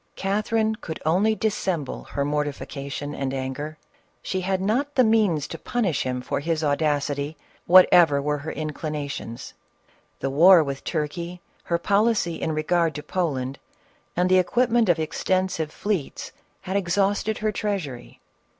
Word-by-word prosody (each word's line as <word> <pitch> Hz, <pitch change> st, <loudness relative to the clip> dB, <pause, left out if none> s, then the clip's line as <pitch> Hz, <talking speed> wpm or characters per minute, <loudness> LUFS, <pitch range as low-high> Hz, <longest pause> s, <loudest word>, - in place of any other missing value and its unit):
Catherine 215 Hz, +3 st, 0 dB
could 160 Hz, -7 st, -7 dB
only 195 Hz, +7 st, +3 dB
dissemble 185 Hz, -9 st, -2 dB
her 140 Hz, -, -2 dB
mortification 145 Hz, -1 st, -3 dB
and 135 Hz, -2 st, -3 dB
anger; 135 Hz, +4 st, -4 dB, 0.5 s
she 185 Hz, -, -2 dB
had 190 Hz, 0 st, 0 dB
not 250 Hz, +10 st, 0 dB
the 255 Hz, -, +5 dB
means 210 Hz, -, +2 dB
to -, -, -7 dB
punish 210 Hz, -, -1 dB
him 125 Hz, -1 st, -2 dB
for -, -, -2 dB
his 160 Hz, +1 st, -1 dB
audacity, 145 Hz, 0 st, 0 dB, 0.3 s
whatever 175 Hz, -4 st, +7 dB
were 150 Hz, +1 st, -1 dB
her 150 Hz, +3 st, -5 dB
inclinations. 150 Hz, -5 st, -5 dB, 0.7 s
The 135 Hz, -, -2 dB
war 170 Hz, +4 st, +7 dB
with 140 Hz, -2 st, -5 dB
Turkey, 170 Hz, +3 st, -3 dB, 0.3 s
her 170 Hz, -, +1 dB
policy 200 Hz, -1 st, +1 dB
in 160 Hz, -, -1 dB
regard 160 Hz, +1 st, +1 dB
to 150 Hz, -, -5 dB
Poland, 140 Hz, -6 st, -2 dB, 0.6 s
and 180 Hz, +1 st, +3 dB
the 185 Hz, 0 st, +5 dB
equipment 235 Hz, +3 st, +2 dB
of 175 Hz, -, +4 dB
extensive 165 Hz, 0 st, -1 dB
fleets, 195 Hz, -7 st, -3 dB, 0.3 s
had 190 Hz, -, -4 dB
exhausted 200 Hz, +3 st, +1 dB
her 215 Hz, 0 st, 0 dB
treasury. 185 Hz, -, -4 dB
170 Hz, 140 wpm, -24 LUFS, 145-195 Hz, 0.7 s, whatever